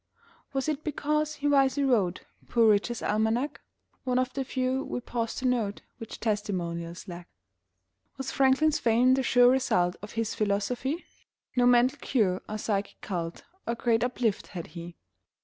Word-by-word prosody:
Was 270 0 -2
it 305 -1 -2
because 300 0 -1
he 290 - -2
wisely 280 0 +3
wrote 205 -9 +2 0.3
Poor 230 -2 +4
Richard's 215 +3 0
Almanac 220 +6 0 0.4
(One 250 -1 0
of 255 0 0
the 270 - -2
few, 260 0 -1
we - - -4
pause 230 -2 -3
to 260 - -4
note, 225 -5 -1 0.2
Which 225 - -8
testimonials 175 -6 -3
lack)? 175 -1 -8 0.9
Was 265 -1 -4
Franklin's 280 +3 +3
fame 245 +1 +4
the 265 - +2
sure 245 -1 +5
result 180 -9 +1
Of 210 - -9
his 225 -1 -1
philosophy? 240 - -1 0.5
(No 245 -1 +4
mental 245 +1 +4
cure 195 -8 +1
or 215 - -3
psychic 205 -2 -2
cult 170 -4 -4 0.2
Or 235 - 0
Great 230 -1 +1
Uplift 245 -4 -1
had 175 -4 -6
he.) 170 0 -8
240 Hz, 155 wpm, -28 LUFS, 205-265 Hz, 0.9 s, sure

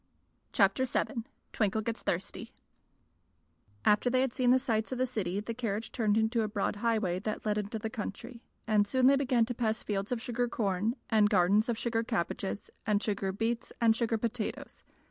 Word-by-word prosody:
Chapter 200 +5 +3
VII 240 -2 -1 0.3
Twinkle 215 0 +1
Gets 230 0 -3
Thirsty 185 +3 -3 1.3
AFTER 210 +4 +4
they 255 +1 +3
had 260 -2 0
seen 255 -2 +2
the 255 - +7
sights 230 -4 -1
of 255 - -2
the 255 - +2
city 200 -7 -2
the 220 +3 -4
carriage 225 -2 -3
turned 215 -3 +1
into 225 +1 +2
a 215 - 0
broad 205 0 -2
highway 215 -5 0
that 210 +2 -4
led 210 0 +1
into 210 +2 -4
the 220 - -3
country, 235 +3 -6 0.2
and 210 -2 +3
soon 260 +3 +2
they 275 +2 +7
began 255 -4 +2
to 245 - -3
pass 220 -2 -1
fields 200 +1 -2
of 245 - 0
sugar 245 +1 -1
corn 210 0 0 0.2
and 215 -2 +5
gardens 200 +4 +3
of 235 - 0
sugar 230 0 0
cabbages 200 -2 -3
and 210 -1 +1
sugar 200 -2 -1
beets 225 +4 -2
and 225 -1 +4
sugar 230 -1 0
potatoes. 225 0 -4
220 Hz, 185 wpm, -31 LUFS, 205-240 Hz, 1.3 s, the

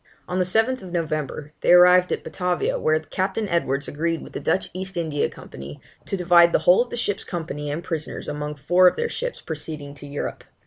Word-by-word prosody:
On 180 +1 -2
the 185 - +2
7th 225 +7 +1
November 155 -5 -3
they - - +3
arrived 180 0 +7
at - - -2
Batavia, 180 -1 -1
where 155 0 +2
Captain 190 +6 -2
Edwards 140 -6 0
agreed 165 +2 -2
with - - -12
the - - -4
Dutch 190 - 0
East 190 0 -5
India 155 -4 0
Company, 70 +2 -10 0.3
to 195 - -1
divide 175 -1 +5
the - - +6
whole 180 - +7
of 245 - -2
the 240 - -5
ship's 205 -4 -1
company 155 -4 -5
and 155 +4 -3
prisoners 160 -4 -5
among 150 0 -4
four 175 +6 +4
of - - +4
their 470 - -1
ships - - -4
proceeding 150 -2 -6
to 145 0 -11
Europe. 145 0 -5
170 Hz, 200 wpm, -23 LUFS, 150-185 Hz, 0.3 s, arrived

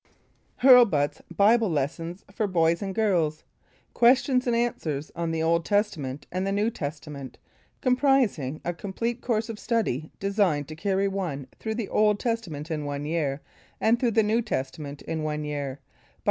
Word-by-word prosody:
RLBUT'S 235 - +6 0.2
BIBLE 220 +1 +5
LESSONS 165 +4 -3
FOR 215 +1 0
BOYS 170 -2 +2
AND 195 -2 -4
GIRLS 175 -8 +1 0.5
QUESTIONS 255 +1 +4
AND 240 - +2
ANSWERS 160 -12 -2
ON 170 0 -2
The 160 0 -1
Old 170 +1 +2
Testament 150 -10 -1
and 185 +2 -1
the - - 0
New 205 +3 +1
Testament 145 - -6 0.4
COMPRISING 250 - +2
A 175 - -1
COMPLETE 230 +7 -3
COURSE 225 -2 -1
OF 220 -2 -6
STUDY 160 - -1
Designed 195 -8 +1
to 155 - -7
carry 195 +3 0
one 180 -9 -3
through 220 -1 -3
the 225 -3 -3
Old 210 -1 +3
Testament 175 - -3
in 155 -2 -2
one 145 0 -3
year, 150 -3 -1 0.4
and 230 +2 +3
through 245 - +2
the 220 - +6
New 220 +3 +2
Testament 140 - -4
in 160 -1 -3
one 150 0 -2
year 145 -2 -3 0.2
BY - - -37
REV. - - -33
185 Hz, 165 wpm, -26 LUFS, 150-220 Hz, 0.5 s, RLBUT'S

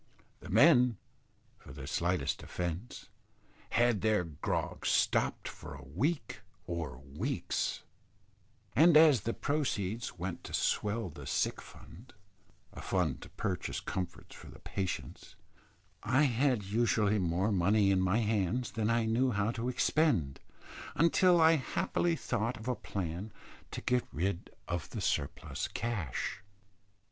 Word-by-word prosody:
The - - -11
men, 125 -3 +5 0.6
for 65 - -12
the 65 -1 -8
slightest 85 +5 -1
offence, 90 +6 -5 0.6
had 120 -3 +2
their 110 -4 +2
grog 80 -4 -3
stopped - - +1
for 75 -2 -8
a 70 - -11
week 130 - -2 0.2
or 85 -7 -4
weeks; 70 +2 -3 0.9
and 160 +4 +7
as 155 -6 +7
the 115 - -2
proceeds 115 -9 -2
went 90 +1 -5
to - - -3
swell 105 -2 0
the 75 -2 -10
sick - - 0
fund 115 +7 -14 0.6
a - - -8
fund 85 -8 0
to - - -10
purchase 95 -5 -3
comforts 90 -2 -5
for - - -12
the - - -12
patients 95 -2 -5 0.7
I 130 +6 +3
had 125 -3 +2
usually 105 0 +2
more 90 +4 +1
money 100 +2 +3
in 95 -1 +3
my 95 +5 +2
hands 110 +2 0
than 110 -1 -1
I 115 -1 +2
knew 120 +4 +2
how 105 -1 0
to 120 +1 -3
expend, 120 - +1 0.6
until 175 +2 +4
I 160 0 +6
happily 170 +4 0
thought 120 -4 -2
of 110 - -9
a 125 - +2
plan 95 -2 -5 0.4
to - - -6
get 125 -1 +1
rid 90 +3 -2 0.2
of 85 -2 -3
the - - -5
surplus 70 - -2
cash. 95 - -3
105 Hz, 135 wpm, -32 LUFS, 90-125 Hz, 0.9 s, and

